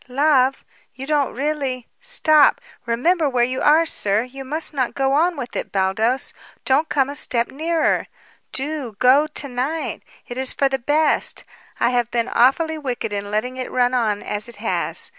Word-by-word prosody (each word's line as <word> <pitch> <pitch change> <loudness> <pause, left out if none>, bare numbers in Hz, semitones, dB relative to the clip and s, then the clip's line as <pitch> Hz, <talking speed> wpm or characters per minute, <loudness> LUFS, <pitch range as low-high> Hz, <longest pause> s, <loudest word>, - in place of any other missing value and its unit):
"Love? 270 0 +2 0.3
You 265 - -7
don't 290 -2 0
really 270 -3 -2
Stop! 315 -11 +4 0.3
Remember 300 +7 +1
where 250 -2 +1
you 255 +2 -1
are, 315 +3 +5
sir! 210 -8 +1
You 265 +2 -9
must 305 +4 -1
not 260 -4 -1
go 270 0 +1
on 335 +3 +2
with 245 -3 -6
it, - - -4
Baldos. 210 +7 0 0.3
Don't 280 +4 +2
come 270 -3 +2
a 285 - -6
step 240 -3 +1
nearer. 320 +4 0 0.4
Do 270 -5 -4
go 270 +6 +4
to 300 -2 -4
night! 270 +6 -3 0.3
It 245 +1 -6
is 260 -1 +4
for 275 - +2
the 270 0 -2
best. 300 +5 +1 0.4
I 240 - +2
have 240 -2 0
been 235 0 -1
awfully 315 +6 +2
wicked 250 -6 -4
in 205 0 -4
letting 245 +5 -2
it 255 - -4
run 250 0 +1
on 220 -5 0
as 210 +3 -4
it 235 - -12
has. 215 +2 -2
265 Hz, 180 wpm, -21 LUFS, 240-300 Hz, 0.4 s, are